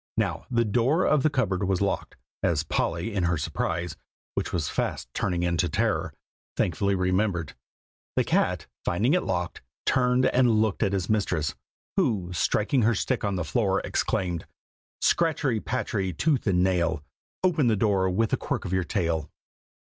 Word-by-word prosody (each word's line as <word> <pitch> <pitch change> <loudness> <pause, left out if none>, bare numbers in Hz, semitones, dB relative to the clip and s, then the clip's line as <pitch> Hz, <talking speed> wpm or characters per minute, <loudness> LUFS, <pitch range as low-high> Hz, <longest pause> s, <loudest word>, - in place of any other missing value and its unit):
Now - - -1
the 115 -2 +2
door 125 - +2
of 150 -2 +3
the 155 - +3
cupboard 100 -9 0
was 95 -1 +1
locked, 100 -1 -2 0.2
as - - +1
Polly, 85 +7 -1
in 95 -4 +1
her 85 -1 +1
surprise, 85 +3 -2 0.4
(which - - -2
was 80 -4 -1
fast - - -2
turning 90 -3 -1
into 85 -2 +1
terror,) - - 0 0.5
thankfully 100 +4 +1
remembered. 90 -3 0 0.6
The - - +3
cat, - - +1 0.2
finding 115 - +1
it 180 - +3
locked, 90 -1 -2 0.2
turned 125 0 +3
and 125 -4 +4
looked 110 -3 +1
at 100 -3 +2
his 95 -3 -1
mistress, 90 -8 0 0.4
who, 105 - +1
striking 110 - +1
her 115 +1 +3
stick 125 +5 -1
on 100 -2 0
the 90 - -2
floor, 100 -6 +1
exclaimed 90 -3 -1 0.6
"Scratchery, 150 -8 +2
patchery, 100 -6 -2
tooth 140 - +1
and 90 -2 +3
nail; 85 -5 +1 0.4
Open 160 -8 +3
the 110 - +4
door 95 -3 +2
with 110 +4 0
a - - +4
quirk - - -3
of 90 - -3
your 95 0 +2
tail." 85 -6 -1
100 Hz, 165 wpm, -26 LUFS, 90-120 Hz, 0.6 s, and